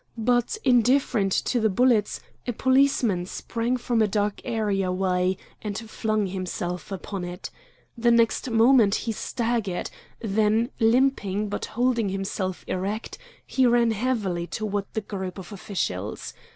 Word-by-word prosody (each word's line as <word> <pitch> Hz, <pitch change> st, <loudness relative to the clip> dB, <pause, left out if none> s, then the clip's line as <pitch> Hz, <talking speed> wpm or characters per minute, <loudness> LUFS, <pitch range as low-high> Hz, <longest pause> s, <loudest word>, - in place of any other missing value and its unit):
But, 240 Hz, -, +1 dB
indifferent 245 Hz, -4 st, +3 dB
to 245 Hz, -, +1 dB
the 220 Hz, -1 st, +2 dB
bullets, 225 Hz, 0 st, +2 dB, 0.3 s
a 245 Hz, -, 0 dB
policeman 260 Hz, -8 st, +2 dB
sprang 235 Hz, +5 st, -2 dB
from 240 Hz, -1 st, 0 dB
a 215 Hz, -, +4 dB
dark 205 Hz, 0 st, -1 dB
areaway 190 Hz, -4 st, 0 dB, 0.2 s
and 205 Hz, -2 st, -4 dB
flung 215 Hz, -1 st, -1 dB
himself 180 Hz, -1 st, -4 dB
upon 195 Hz, 0 st, -5 dB
it. 175 Hz, +2 st, -6 dB, 0.4 s
The 235 Hz, 0 st, +2 dB
next 235 Hz, +2 st, +3 dB
moment 225 Hz, -2 st, +5 dB
he 230 Hz, -, 0 dB
staggered. 225 Hz, -4 st, -2 dB, 0.3 s
Then 220 Hz, +3 st, +1 dB
limping, 225 Hz, -4 st, +2 dB
but -, -, -3 dB
holding 240 Hz, -4 st, +2 dB
himself 190 Hz, -1 st, -3 dB
erect, 200 Hz, +4 st, -3 dB, 0.3 s
he 260 Hz, -2 st, +2 dB
ran 235 Hz, -1 st, +4 dB
heavily 205 Hz, -7 st, -1 dB
toward 205 Hz, -1 st, -2 dB
the 220 Hz, -, -1 dB
group 190 Hz, -2 st, -5 dB
of 185 Hz, 0 st, -9 dB
officials. 110 Hz, -, -4 dB
215 Hz, 130 wpm, -25 LUFS, 195-235 Hz, 0.4 s, moment